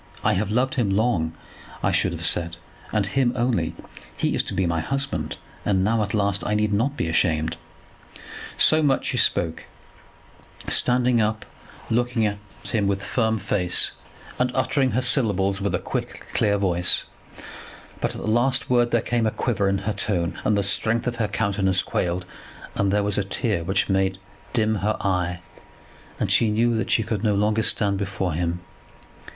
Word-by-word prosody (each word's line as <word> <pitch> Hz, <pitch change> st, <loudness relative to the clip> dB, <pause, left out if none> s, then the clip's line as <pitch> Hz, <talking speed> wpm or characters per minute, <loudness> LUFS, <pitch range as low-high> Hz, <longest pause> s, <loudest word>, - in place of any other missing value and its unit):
'I -, -, +3 dB
have 100 Hz, +2 st, -1 dB
loved 125 Hz, +4 st, +1 dB
him 120 Hz, -6 st, 0 dB
long,' 95 Hz, -6 st, +1 dB, 0.5 s
I -, -, +2 dB
should -, -, +1 dB
have -, -, -4 dB
said, 85 Hz, 0 st, 0 dB, 0.4 s
'and 105 Hz, -2 st, +1 dB
him 120 Hz, +4 st, +1 dB
only. 120 Hz, -1 st, 0 dB, 0.4 s
He -, -, 0 dB
is -, -, +2 dB
to -, -, -5 dB
be 95 Hz, -, +1 dB
my 85 Hz, -1 st, 0 dB
husband, 135 Hz, -, -3 dB, 0.3 s
and 95 Hz, -2 st, +1 dB
now 110 Hz, +2 st, +2 dB
at 105 Hz, 0 st, -2 dB
last 100 Hz, -1 st, 0 dB
I 105 Hz, -, 0 dB
need 105 Hz, 0 st, +1 dB
not 130 Hz, +8 st, 0 dB
be -, -, -1 dB
ashamed.'" 80 Hz, 0 st, +1 dB, 1.0 s
So 155 Hz, 0 st, +5 dB
much 145 Hz, -3 st, +1 dB
she -, -, -2 dB
spoke, 80 Hz, -1 st, +1 dB, 1.0 s
standing 125 Hz, -1 st, +3 dB
up, 110 Hz, +1 st, -1 dB, 0.5 s
looking 120 Hz, -1 st, +1 dB
at 105 Hz, -1 st, -2 dB, 0.2 s
him 105 Hz, -3 st, -1 dB
with 100 Hz, 0 st, -1 dB
firm 110 Hz, 0 st, 0 dB
face, 95 Hz, -3 st, +1 dB, 0.5 s
and 125 Hz, 0 st, +1 dB
uttering 130 Hz, 0 st, +1 dB
her 130 Hz, -, +1 dB
syllables 100 Hz, -6 st, +2 dB
with 100 Hz, -, 0 dB
a -, -, +2 dB
quick -, -, -5 dB
clear 100 Hz, -1 st, +2 dB
voice; 90 Hz, -3 st, +1 dB, 1.0 s
but -, -, -2 dB
at -, -, -7 dB
the -, -, -5 dB
last 120 Hz, +4 st, +2 dB
word 120 Hz, -1 st, +3 dB
there 120 Hz, -1 st, +2 dB
came 120 Hz, -1 st, 0 dB
a -, -, +3 dB
quiver 105 Hz, -3 st, -1 dB
in 100 Hz, -, +1 dB
her 105 Hz, -, 0 dB
tone, 90 Hz, -4 st, -1 dB
and 105 Hz, -, +2 dB
the 100 Hz, -, +1 dB
strength 110 Hz, +4 st, +3 dB
of 120 Hz, -1 st, -2 dB
her 110 Hz, -2 st, 0 dB
countenance 100 Hz, -2 st, +2 dB
quailed, 90 Hz, +1 st, -2 dB, 0.5 s
and 100 Hz, -1 st, 0 dB
there 105 Hz, 0 st, +2 dB
was 105 Hz, 0 st, +1 dB
a -, -, 0 dB
tear 100 Hz, -2 st, -2 dB
which 95 Hz, +3 st, +1 dB
made 95 Hz, -1 st, +1 dB, 0.3 s
dim 110 Hz, -2 st, +1 dB
her 105 Hz, +2 st, -1 dB
eye, 90 Hz, -2 st, -1 dB, 0.8 s
and -, -, 0 dB
she 115 Hz, -, +4 dB
knew 115 Hz, +2 st, +2 dB
that 110 Hz, -, -2 dB
she 110 Hz, -, +3 dB
could 110 Hz, -1 st, -3 dB
no 105 Hz, -2 st, +2 dB
longer 105 Hz, +2 st, +1 dB
stand 100 Hz, -3 st, +2 dB
before 95 Hz, -3 st, -2 dB
him. 85 Hz, +2 st, -2 dB
105 Hz, 180 wpm, -23 LUFS, 95-115 Hz, 1.0 s, So